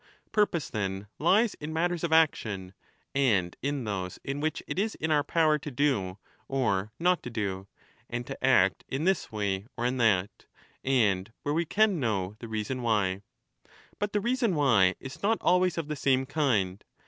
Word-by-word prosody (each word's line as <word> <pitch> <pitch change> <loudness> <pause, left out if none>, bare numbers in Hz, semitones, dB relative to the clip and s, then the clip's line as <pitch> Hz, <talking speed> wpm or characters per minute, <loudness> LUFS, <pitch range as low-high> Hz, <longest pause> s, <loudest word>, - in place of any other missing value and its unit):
Purpose, 210 -7 +1
then, 95 -2 -3
lies 195 +8 +4
in 150 +1 -4
matters 175 +1 0
of 170 - -1
action, 105 - +2 0.4
and 105 -11 +2
in 140 -1 -2
those 95 -4 -4
in 140 +1 -3
which 155 +1 -2
it - - -3
is 220 +2 0
in 160 0 -2
our 150 -1 +3
power 155 -2 +2
to 150 - -6
do 125 -9 0 0.3
or 110 -7 0
not 180 +1 +2
to - - -6
do, 100 -4 -3 0.4
and 120 0 -3
to 135 +1 -8
act 95 -8 +4
in 135 +3 -2
this 190 -5 +1
way 100 -1 -2
or 120 - -1
in 125 +1 0
that, 105 -5 +1 0.4
and 110 -6 +2
where 145 - 0
we 170 +2 +1
can 205 +1 +2
know 105 -6 -1
the 115 - -7
reason 110 +4 -3
why. 100 -5 +1 0.8
But 205 0 -1
the 210 - +1
reason 235 -4 +1
why 115 -11 +4
is 135 -1 -9
not 220 +3 +2
always 180 -1 +2
of 165 -3 -2
the 150 - -3
same 135 -1 +2
kind. 115 -11 0
130 Hz, 180 wpm, -28 LUFS, 100-160 Hz, 0.8 s, lies